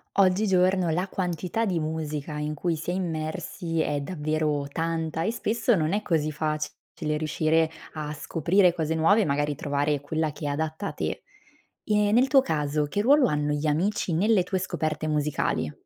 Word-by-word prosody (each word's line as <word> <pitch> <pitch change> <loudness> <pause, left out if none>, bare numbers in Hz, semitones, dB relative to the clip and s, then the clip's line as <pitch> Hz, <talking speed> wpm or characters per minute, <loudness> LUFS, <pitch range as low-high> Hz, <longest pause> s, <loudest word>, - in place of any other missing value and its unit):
Oggigiorno 185 -2 +3
la 180 +4 0
quantità 185 +4 -2
di 180 -5 0
musica 155 -1 -3
in 150 0 -2
cui 165 +3 -1
si 160 +3 -4
è - - -2
immersi, 165 0 -3
è 145 -1 0
davvero 150 -2 -1
tanta, 165 0 -2
e 220 - +1
spesso 230 +1 +1
non 160 -3 0
è 210 +2 0
così 155 -5 0
facile 150 0 -3
riuscire 155 +1 +2 0.3
a 150 -1 -4
scoprire 170 +4 +2
cose 160 -2 -1
nuove, 190 +7 +4
magari 145 0 0
trovare 145 +1 -1
quella 155 +1 -1
che 150 - -11
è - - 0
adatta 155 +5 -3
a - - -3
te. - - -4 0.6
Eh, 210 -1 +2
nel 245 +5 +4
tuo 270 -1 +6
caso, 150 - 0
che 200 +8 -1
ruolo 275 +4 +5
hanno 150 0 0
gli 150 +1 -1
amici 175 +4 0
nelle 205 +3 +3
tue 190 +2 -2
scoperte 160 -4 -2
musicali? 150 - 0
160 Hz, 170 wpm, -26 LUFS, 150-185 Hz, 0.6 s, tuo